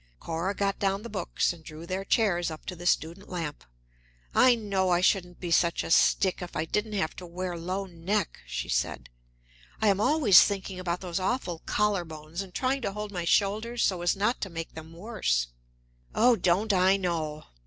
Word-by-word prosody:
Cora 170 +5 -2
got 200 0 -1
down 195 +1 0
the 235 - -8
books 195 -3 0
and 165 -2 -15
drew 155 +1 -9
their 185 +2 -3
chairs 195 -5 +2
up 155 -1 -9
to 180 - -5
the 175 +1 -5
student 170 +4 0
lamp. 165 -5 -5 0.7
"I 255 -1 +6
know 200 -4 0
I 175 -1 +3
shouldn't 180 -1 +1
be 175 -2 -4
such 170 0 +3
a - - -5
stick 190 +3 +3
if 180 - -7
I 155 - -1
didn't 210 +6 -2
have 195 -6 -1
to 180 - -7
wear 180 +1 -4
low 185 +4 -3
neck," 185 +1 -2
she - - -4
said. - - -2 0.7
"I 215 - +3
am 200 0 +2
always 250 - +7
thinking 195 -2 -1
about 175 -1 -2
those 180 -1 -3
awful 185 -4 -1
collar 210 -3 +1
bones, 160 +2 -7
and 195 -2 -8
trying 260 +7 0
to 195 - -2
hold 210 0 -5
my 175 -3 -3
shoulders 215 +6 +1
so 185 -3 +1
as 175 +2 +2
not 210 +5 0
to 195 - -3
make 165 -1 -6
them 160 0 -10
worse." 165 - -1 0.7
"Oh, 240 +2 +5
don't 200 +2 +2
I 190 +1 +4
know!" 160 -5 -2
185 Hz, 195 wpm, -28 LUFS, 170-205 Hz, 0.7 s, always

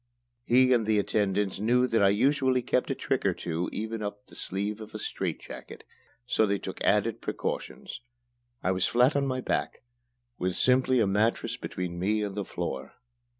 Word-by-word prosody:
He 130 +2 +5
and 115 -3 +2
the 110 -1 +3
attendants 100 -1 0
knew 125 +4 +3
that 115 -3 +1
I 100 - +6
usually 130 +3 +2
kept 125 - +1
a - - 0
trick - - -1
or - - +2
two 85 +1 -3
even 110 +1 -4
up 105 0 -5
the - - -17
sleeve 105 +3 -3
of 110 0 -10
a - - -1
strait - - -3
jacket, - - -10 0.4
so 110 -3 +2
they 100 0 +1
took 95 - -7
added 105 +2 +2
precautions. - - -4 0.6
I 95 - +2
was 95 0 +2
flat 125 +4 +4
on 140 -1 +1
my 130 -1 -1
back, - - -2 0.6
with 90 0 -1
simply 130 0 +3
a - - +4
mattress 110 +3 +1
between 90 -7 -5
me 105 +3 +1
and 100 -1 -3
the 100 0 -2
floor. 65 -6 -5
110 Hz, 185 wpm, -28 LUFS, 100-125 Hz, 0.6 s, I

